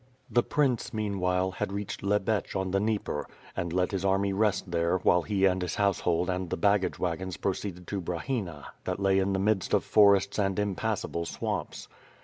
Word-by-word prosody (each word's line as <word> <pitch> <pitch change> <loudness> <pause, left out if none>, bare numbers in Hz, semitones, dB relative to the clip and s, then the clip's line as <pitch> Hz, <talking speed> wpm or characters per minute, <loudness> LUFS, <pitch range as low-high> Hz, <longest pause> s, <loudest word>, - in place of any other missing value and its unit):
The 120 - +4
prince, 130 -4 0
meanwhile, 95 -3 0
had 95 - -3
reached 100 0 -4
Tjcbetch 105 +1 0
on 95 -1 -1
the 100 - +2
Dnieper, 105 -8 -1 0.3
and 85 - -2
let 90 +1 +1
his 95 -2 -2
army 100 0 +2
rest 100 -3 0
there, 85 +1 +2
while 90 -1 +3
he 100 0 +1
and 95 -1 +2
his 90 - -2
house 100 -2 +2
hold 85 0 +1
and 90 -1 -2
the - - -2
baggage 100 +2 +2
wagons 90 0 -3
proceeded 95 -2 -3
to 100 +1 -3
Brahina, 85 - -3 0.2
that - - -2
lay 95 -1 +3
in 95 +1 +1
the - - +1
midst 100 -1 +1
of - - +1
forests 100 -1 +4
and 95 -2 +1
impassable 105 -3 -1
swamps. - - -4
95 Hz, 185 wpm, -28 LUFS, 90-100 Hz, 0.3 s, The